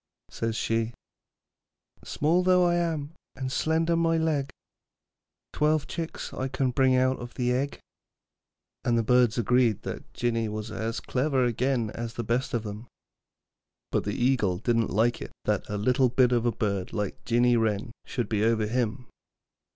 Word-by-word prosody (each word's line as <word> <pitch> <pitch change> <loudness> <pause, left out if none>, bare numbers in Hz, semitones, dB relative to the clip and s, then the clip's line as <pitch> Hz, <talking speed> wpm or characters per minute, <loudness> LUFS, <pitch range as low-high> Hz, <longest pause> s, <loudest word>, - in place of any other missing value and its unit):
Says 115 -1 -2
she: 115 +1 -1 1.1
Small 165 +5 +1
though 180 0 +4
I 175 - +3
am 165 -4 -1 0.2
and 130 -1 -4
slender 165 +3 +1
my 165 0 +2
leg, 155 -4 0 1.0
Twelve 150 0 +2
chicks 165 -1 -5
I 130 - -2
can 130 -1 0
bring 130 +1 +3
out 130 +1 +2
of 120 0 -8
the 125 -1 0
egg. 140 +3 -1 1.1
And 120 -1 +2
the 115 - +2
birds 125 0 +3
agreed 120 -2 +2
that - - -7
Jinny 115 -2 0
was 110 +1 -5
as 115 +1 -3
clever 130 -1 +1
again 120 -1 0
as 115 -1 -6
the 120 - -3
best 120 +3 -1
of 115 - -1
them. 105 +2 -7 1.0
But - - 0
the 105 - -2
eagle 120 -8 +2
didn't 115 +2 +1
like 115 +5 +1
it - - -7
that - - -1
a 105 - -2
little 125 +4 +3
bit 125 +1 +3
of 120 -1 +2
a - - +3
bird 100 -5 -2
like 105 -3 -3
Jinny 120 +1 +3
Wren 110 -1 0
should 120 -3 -3
be 105 -1 0
over 110 -1 +2
him. 120 +2 -1
120 Hz, 165 wpm, -27 LUFS, 115-135 Hz, 1.1 s, though